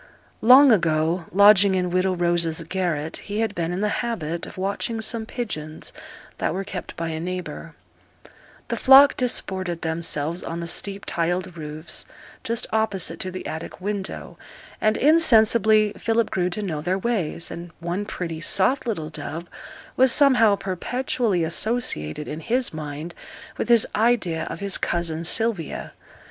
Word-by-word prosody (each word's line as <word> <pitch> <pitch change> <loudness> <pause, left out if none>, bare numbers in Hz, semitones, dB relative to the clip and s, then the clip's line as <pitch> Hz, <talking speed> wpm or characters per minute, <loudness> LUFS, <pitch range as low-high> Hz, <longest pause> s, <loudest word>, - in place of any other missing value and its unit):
Long 260 +4 +8
ago, 165 -2 +1
lodging 200 0 +6
in 180 -1 -1
widow 185 +1 +1
Rose's 170 -2 0
garret, 165 -5 -2
he 210 +2 -4
had 225 -2 -1
been 170 -3 -2
in 180 +2 -3
the 210 - +1
habit 170 -9 -3
of - - -12
watching 200 +4 -2
some 220 0 -1
pigeons 155 -12 -6 0.5
that - - -1
were 195 - -2
kept 190 -1 -7
by 165 0 -3
a 160 -1 -4
neighbour; 180 +2 -6 0.9
the - - -2
flock 275 +1 +7
disported 190 -8 -1
themselves 160 0 -1
on 165 +1 -5
the 170 - -4
steep 195 +4 -2
tiled 175 +1 -2
roofs 155 0 -6 0.4
just 230 0 -1
opposite 220 -5 0
to 185 - -3
the 185 0 -7
attic 160 +2 -6
window, 200 0 -5 0.4
and 215 0 +2
insensibly 220 -8 +4
Philip 225 0 0
grew 180 -1 0
to 210 +4 -3
know 160 -6 -3
their 180 +4 -1
ways, 190 -7 -2
and 170 +1 -7
one 175 +4 -3
pretty, 165 -5 -5
soft 240 +9 +1
little 160 -9 -3
dove 165 +2 -6 0.5
was 260 -1 +5
somehow 250 -7 +5
perpetually 200 0 -2
associated 160 - -2
in 155 - -5
his 245 +7 0
mind 155 +2 -6 0.4
with - - -4
his 235 -2 +6
idea 210 -8 +1
of - - -7
his 200 -1 +1
cousin 165 -2 -1
Sylvia. 205 -2 0
185 Hz, 150 wpm, -23 LUFS, 165-220 Hz, 0.9 s, Long